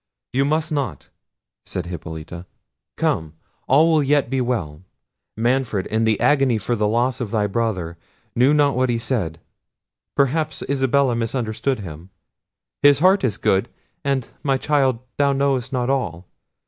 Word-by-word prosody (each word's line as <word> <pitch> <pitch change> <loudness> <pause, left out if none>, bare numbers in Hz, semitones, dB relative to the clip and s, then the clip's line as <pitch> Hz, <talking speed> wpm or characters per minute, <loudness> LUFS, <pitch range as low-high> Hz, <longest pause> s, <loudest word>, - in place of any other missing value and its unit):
"You 135 +2 +2
must 155 +2 0
not," 135 - -3 0.5
said 90 - -4
Hippolita—"come, 80 -1 -5 0.3
all 155 +5 +5
will 155 -2 +4
yet 140 -2 +1
be 135 -1 +1
well. 100 -12 -2 0.6
Manfred, 120 -4 0
in 110 +1 0
the 110 -2 +2
agony 135 -5 +3
for 120 +3 -1
the 105 -2 +1
loss 120 +3 0
of 115 - -3
thy 105 -1 +1
brother, 95 -6 -2 0.4
knew 125 +4 +4
not 145 -2 +3
what 130 0 +1
he 120 - +1
said; 110 -9 -2 0.8
perhaps 155 +3 0
Isabella 135 -1 +2
misunderstood 115 +1 -2
him; 85 -1 -9 0.7
his 145 -1 +6
heart 185 +6 +4
is 110 -5 0
good—and, 130 +6 -2
my 135 -2 +1
child, 135 -4 +1 0.2
thou 140 -1 +3
knowest 135 -3 0
not 125 -2 -1
all! 95 - -1
125 Hz, 140 wpm, -21 LUFS, 105-140 Hz, 0.8 s, his